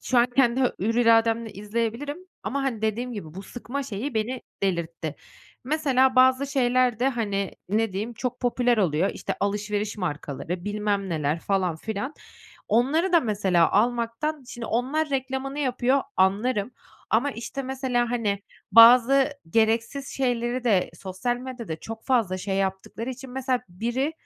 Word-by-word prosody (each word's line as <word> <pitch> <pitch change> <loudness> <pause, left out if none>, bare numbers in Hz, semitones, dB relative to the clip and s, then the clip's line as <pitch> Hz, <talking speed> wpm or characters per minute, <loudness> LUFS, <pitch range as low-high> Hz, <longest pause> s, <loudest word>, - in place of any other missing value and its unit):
Şu 250 - +1
an 240 - +5
kendi 255 -1 +4
hür 230 -3 0
irademle 230 -1 +3
izleyebilirim 230 - -3 0.2
ama, 280 0 -2
hani, 235 -5 -2
dediğim 235 +3 -1
gibi 165 -8 -7
bu 195 - -7
sıkma 245 +6 -5
şeyi 250 +2 -4
beni 235 +4 -2 0.2
delirtti. 170 -4 -2 0.5
Mesela, 265 -3 +2
bazı 260 +2 +5
şeyler 255 -3 +2
de, 260 - +3
hani, 205 -6 -2 0.2
ne 220 0 +1
diyeyim, 215 +5 -3
çok 245 +2 -4
popüler 245 -1 +2
oluyor. 180 0 +2
İşte, - - -4
alışveriş 210 +1 -1
markaları, 170 0 -4
bilmem 205 -1 -1
neler, 155 -1 -1
falan 185 -4 0
filan. 220 - -4 0.5
Onları 295 - +2
da, 340 - +6
mesela, 195 - +2
almaktan 240 +7 0
Şimdi 240 -3 -6
onlar 275 +8 0
reklamını 265 +1 -2
yapıyor, 260 -1 +1
anlarım 205 +4 +2 0.4
ama, 240 +6 +2
işte, 265 +3 -5
mesela, 255 -2 -1
hani, 205 -5 -1 0.3
bazı 250 +5 +8 0.2
gereksiz 230 +6 +1
şeyleri 245 -1 -1
de 205 -6 +2
sosyal 195 +6 -2
medyada 245 -9 -6
çok 225 0 -8
fazla 225 -8 +1
şey 195 +1 -2
yaptıkları 195 +5 -2
için, 260 0 -9
mesela, 255 -1 -1
biri 240 - -2
235 Hz, 145 wpm, -25 LUFS, 205-255 Hz, 0.5 s, bazı